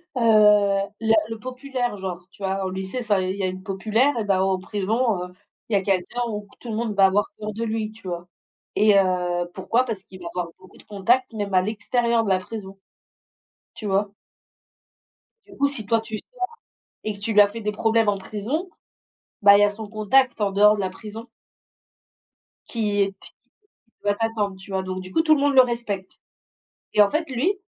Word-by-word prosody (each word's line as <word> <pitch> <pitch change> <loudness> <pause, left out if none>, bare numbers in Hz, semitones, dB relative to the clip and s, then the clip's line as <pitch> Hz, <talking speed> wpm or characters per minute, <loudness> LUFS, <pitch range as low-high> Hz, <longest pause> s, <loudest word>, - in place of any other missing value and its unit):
Heu, 250 - -1 0.8
le 225 0 +2 0.2
le 225 -1 -5
populaire, 255 -2 -3
genre, 180 -2 -6
tu 200 - -14
vois? 190 0 -1
Au - - -1
lycée, 190 +6 -4
ça, 210 -4 +1
il 185 +1 -2
y 200 - -5
a - - +2
une 185 0 -6
populaire 220 +8 +1
et 220 - 0
ben, 195 -2 +2
en 190 -1 +1
prison, 210 +1 0
heu, 180 - -9 0.4
il 220 - -3
y - - +5
a 195 - +3
quelqu'un 195 +4 -1
où 210 -1 -5
tout 240 - -9
le 220 - -2
monde 225 -1 -1
va 195 - +6
avoir 200 +6 +2
peur 215 0 -4
de 225 - -4
lui, 220 -1 -2
tu 215 -3 -13
vois? 175 0 -5 0.5
Et 210 -1 +5
heu, 180 -2 +1
pourquoi? 235 +6 +1
Parce 210 -5 -5
qu'il 185 - -13
va 175 - -6
avoir 180 -1 -2
beaucoup 185 0 -18
de - - -16
contact, 235 +6 +1
même 205 -3 -4
à 185 - +5
l'extérieur 230 +3 0
de 200 - -2
la 185 - +3
prison. 195 0 -8 1.0
Tu 215 - -8
vois? 200 +1 0 1.3
Du 390 - -16
coup, 280 0 +3
si 255 -7 -4
toi, 225 +2 +2
tu 220 -1 -5
sors - - -15 0.6
et 215 - -1
que 200 - -12
tu 220 +2 -2
lui 210 - +8
as 205 - +5
fait 225 +3 -7
des 210 0 -2
problèmes 225 +1 +2
en 205 - +3
prison, 225 - -3 0.7
bah, 200 0 +9
il - - +4
y - - +7
a 205 - +4
son 215 +1 -7
contact 225 +4 +2
en 205 - +2
dehors 210 +2 +5
de - - -3
la 190 - 0
prison 220 +4 -9 1.4
qui 210 -3 0
est 195 - +2
te - - -11
qui - - -19 0.5
qui 230 - -41
doit 205 0 +2
t'attendre, 220 -3 -1
tu 195 +1 -12
vois? 190 0 -1
Donc, 185 0 -4
du 185 - -10
coup, 320 - +3
tout 310 -1 +5
le 280 - -1
monde 285 -1 +2
le 260 - +10
respecte. 235 -6 -3 0.8
Et 210 - +6
en 200 - +6
fait, 315 -1 -1
lui, 265 +10 +1
210 Hz, 220 wpm, -23 LUFS, 190-230 Hz, 1.4 s, le